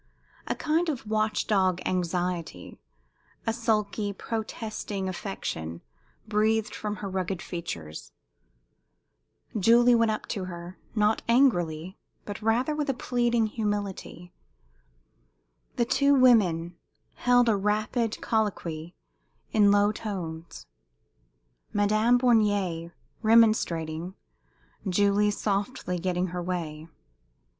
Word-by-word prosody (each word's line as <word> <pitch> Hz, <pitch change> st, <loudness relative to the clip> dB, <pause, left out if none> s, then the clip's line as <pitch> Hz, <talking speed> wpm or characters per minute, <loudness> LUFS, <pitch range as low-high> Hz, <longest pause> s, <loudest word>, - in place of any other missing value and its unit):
A -, -, -1 dB
kind 325 Hz, +2 st, 0 dB
of 265 Hz, -7 st, -4 dB
watch 215 Hz, 0 st, 0 dB
dog 185 Hz, -4 st, +2 dB
anxiety, 175 Hz, -, -2 dB, 0.7 s
a 225 Hz, -, +1 dB
sulky, 215 Hz, -3 st, 0 dB
protesting 215 Hz, -2 st, -4 dB
affection 175 Hz, -, -5 dB, 0.5 s
breathed 215 Hz, +1 st, +1 dB
from 210 Hz, -1 st, -4 dB
her 205 Hz, -, -6 dB
rugged 185 Hz, -1 st, -2 dB
features. 85 Hz, -, -7 dB, 1.5 s
Julie 235 Hz, +4 st, +6 dB
went 230 Hz, -1 st, +4 dB
up 215 Hz, -, -2 dB
to 195 Hz, -5 st, -3 dB
her, 175 Hz, 0 st, -8 dB, 0.2 s
not 210 Hz, 0 st, +2 dB
angrily, 180 Hz, -, +2 dB, 0.3 s
but 205 Hz, +1 st, -6 dB
rather 235 Hz, +7 st, +1 dB
with 300 Hz, -1 st, -2 dB
a 270 Hz, -, +1 dB
pleading 240 Hz, -2 st, +1 dB
humility. 205 Hz, -5 st, -4 dB, 1.4 s
The 240 Hz, -, +1 dB
two 280 Hz, +4 st, +3 dB
women 180 Hz, -10 st, +4 dB, 0.4 s
held 245 Hz, -1 st, +4 dB
a 225 Hz, -, +4 dB
rapid 215 Hz, +3 st, 0 dB
colloquy 175 Hz, -7 st, -2 dB, 0.6 s
in 210 Hz, -2 st, +5 dB
low 205 Hz, +1 st, +4 dB
tones 175 Hz, -7 st, -6 dB, 1.1 s
Madame 215 Hz, +4 st, +3 dB
Bornier 205 Hz, -9 st, +2 dB, 0.3 s
remonstrating, 185 Hz, -7 st, +2 dB, 0.7 s
Julie 205 Hz, +2 st, +3 dB
softly 200 Hz, -2 st, -2 dB
getting 180 Hz, +1 st, -1 dB
her 180 Hz, +1 st, -4 dB
way. 165 Hz, -3 st, -4 dB
205 Hz, 100 wpm, -27 LUFS, 180-225 Hz, 1.5 s, Julie